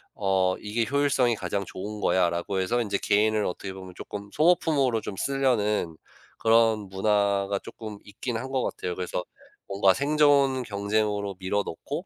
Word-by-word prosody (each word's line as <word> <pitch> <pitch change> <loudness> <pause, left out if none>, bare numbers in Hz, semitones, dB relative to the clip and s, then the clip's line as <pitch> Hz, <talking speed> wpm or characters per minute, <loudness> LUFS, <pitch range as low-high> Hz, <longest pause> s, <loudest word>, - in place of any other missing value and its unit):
어 95 -2 +1
'이게 115 +2 -1
효율성이 140 -4 +2
가장 100 -1 -3
좋은 105 +4 -7
거야.'라고 90 +1 +1
해서 120 +6 +1
인제 100 -3 -1
개인을 105 +1 +2
어떻게 95 +2 -4
보면 95 -1 -10
쪼끔 100 0 -8
소모품으로 150 -7 +3
좀 100 - -6
쓰려는 110 -11 0 0.5
그런 115 -2 +3
문화가 100 0 +1
쪼끔 110 0 -9
있긴 110 +4 -5
한 130 +3 -5
것 130 -1 0
같아요. 90 -1 -4
그래서 90 0 -3 0.4
뭔가 100 -1 +3
생존 140 -2 +3
경쟁으로 100 -1 -1
밀어 100 +2 0
넣고 145 - -5
105 Hz, 335 characters per minute, -26 LUFS, 100-125 Hz, 0.5 s, 소모품으로